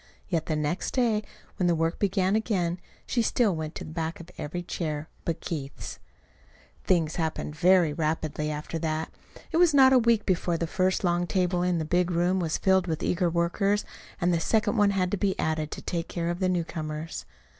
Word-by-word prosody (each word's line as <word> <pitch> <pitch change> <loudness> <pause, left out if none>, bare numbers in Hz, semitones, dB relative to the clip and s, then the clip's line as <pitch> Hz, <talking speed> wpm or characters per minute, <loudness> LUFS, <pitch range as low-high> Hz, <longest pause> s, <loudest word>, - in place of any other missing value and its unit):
Yet 165 -4 -1
the 155 - 0
next 150 +4 -2
day, 230 -5 +2 0.4
when 180 - +2
the 170 - +3
work 165 +1 0
began 195 -1 +2
again, 185 -6 0 0.3
she 240 - +1
still 225 -4 +2
went 155 -1 -5
to - - -5
the - - -8
back 160 0 -3
of 170 +1 -11
every 175 +4 -4
chair 155 -3 -4 0.2
but 165 -1 -2
Keith's. 140 -5 -5 0.8
Things 165 -4 +1
happened 160 -2 -2
very 175 -2 +4
rapidly 155 -1 -1
after 150 +2 -4
that. 160 0 -2 0.4
It - - +1
was 340 -4 +5
not 265 -1 +7
a 255 - +7
week 230 -2 +3
before 175 -2 +1
the 170 - -1
first 185 +3 0
long 175 0 +1
table 180 -1 +1
in 180 -1 +1
the 160 - -1
big 175 +2 +1
room 175 +2 +1
was 165 -3 0
filled 190 -1 +3
with 160 -2 -2
eager 180 0 +1
workers, 185 +5 +1 0.3
and 175 0 +2
the 170 - +2
second 210 +4 +1
one 205 -2 +4
had 185 -2 0
to 205 - 0
be 195 0 0
added 155 -1 -1
to - - -7
take 170 -1 -3
care 170 -1 -2
of 175 - -4
the 185 -1 +1
newcomers. 160 -2 -3
175 Hz, 200 wpm, -27 LUFS, 160-190 Hz, 0.8 s, not